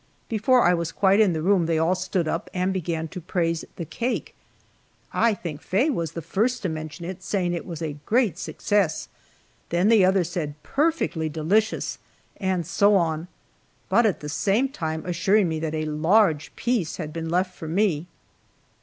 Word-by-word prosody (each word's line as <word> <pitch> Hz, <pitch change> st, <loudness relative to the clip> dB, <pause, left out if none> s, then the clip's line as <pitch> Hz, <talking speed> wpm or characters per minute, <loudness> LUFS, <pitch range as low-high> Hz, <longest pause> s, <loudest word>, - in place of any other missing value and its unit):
Before 235 Hz, +3 st, +3 dB
I 180 Hz, -, +5 dB
was 170 Hz, -2 st, -1 dB
quite 195 Hz, +1 st, +3 dB
in 205 Hz, -5 st, +4 dB
the 160 Hz, -1 st, -2 dB
room 185 Hz, -2 st, +3 dB
they 165 Hz, -1 st, +1 dB
all 165 Hz, +3 st, +3 dB
stood 185 Hz, -2 st, -1 dB
up 165 Hz, -, -2 dB
and 185 Hz, +1 st, +1 dB
began 165 Hz, -3 st, -2 dB
to 180 Hz, -, -7 dB
praise 170 Hz, -1 st, -1 dB
the 170 Hz, -, -5 dB
cake. 240 Hz, -, -3 dB, 0.8 s
I 230 Hz, -2 st, +3 dB
think 160 Hz, -6 st, -6 dB
Faye 240 Hz, +12 st, +1 dB
was 165 Hz, -, -2 dB
the 165 Hz, -, -5 dB
first 225 Hz, -, 0 dB
to 185 Hz, -, 0 dB
mention 155 Hz, +1 st, -6 dB
it, 185 Hz, +1 st, -6 dB
saying 180 Hz, -2 st, -1 dB
it 170 Hz, -, -4 dB
was 165 Hz, -2 st, -5 dB
a 150 Hz, -2 st, -4 dB
"great 230 Hz, -, +2 dB
success"; 200 Hz, -6 st, 0 dB, 0.6 s
then 175 Hz, +5 st, +2 dB
the 220 Hz, -4 st, +6 dB
others 185 Hz, -2 st, +2 dB
said 150 Hz, -5 st, -3 dB
"perfectly 290 Hz, -, 0 dB
delicious," 185 Hz, +9 st, 0 dB, 0.4 s
and 185 Hz, -3 st, -1 dB
so 200 Hz, +4 st, +3 dB
on, 165 Hz, -2 st, 0 dB, 0.6 s
but 235 Hz, -1 st, +4 dB
at 200 Hz, -, -1 dB
the 150 Hz, -, -6 dB
same 205 Hz, -, +1 dB
time 160 Hz, -, -4 dB
assuring 185 Hz, +3 st, +2 dB
me 160 Hz, -1 st, -2 dB
that 160 Hz, 0 st, -3 dB
a 155 Hz, 0 st, -1 dB
large 160 Hz, +1 st, +2 dB
piece 230 Hz, -9 st, -1 dB
had 150 Hz, -1 st, -5 dB
been 165 Hz, 0 st, -4 dB
left 180 Hz, +2 st, 0 dB
for 160 Hz, -, -7 dB
me. 175 Hz, -2 st, +1 dB
175 Hz, 180 wpm, -24 LUFS, 160-205 Hz, 0.8 s, the